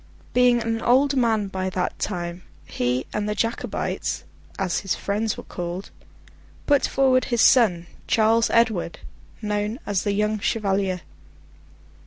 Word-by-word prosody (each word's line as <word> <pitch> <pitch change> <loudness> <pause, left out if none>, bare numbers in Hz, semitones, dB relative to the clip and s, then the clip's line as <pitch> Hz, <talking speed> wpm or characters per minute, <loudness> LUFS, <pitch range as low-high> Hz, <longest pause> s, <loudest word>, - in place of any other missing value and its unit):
Being 250 -1 +4
an 225 0 -2
old 270 +3 +3
man 225 -5 +2
by 190 -1 -3
that 180 -1 -3
time, 175 -2 -3 0.2
he 125 +1 -1
and 210 0 -1
the 210 - -1
Jacobites—as 205 -4 -3
his 195 - -2
friends 210 +2 -2
were - - -7
called—put 185 - -4
forward 260 -1 +3
his 235 -2 +1
son, 195 -10 +5 0.2
Charles 225 +1 +3
Edward, 220 -8 +1 0.4
known 210 +2 -1
as 200 -2 0
the 205 - 0
young 210 +1 0
Chevalier. 195 -4 0
210 Hz, 125 wpm, -24 LUFS, 185-230 Hz, 0.4 s, son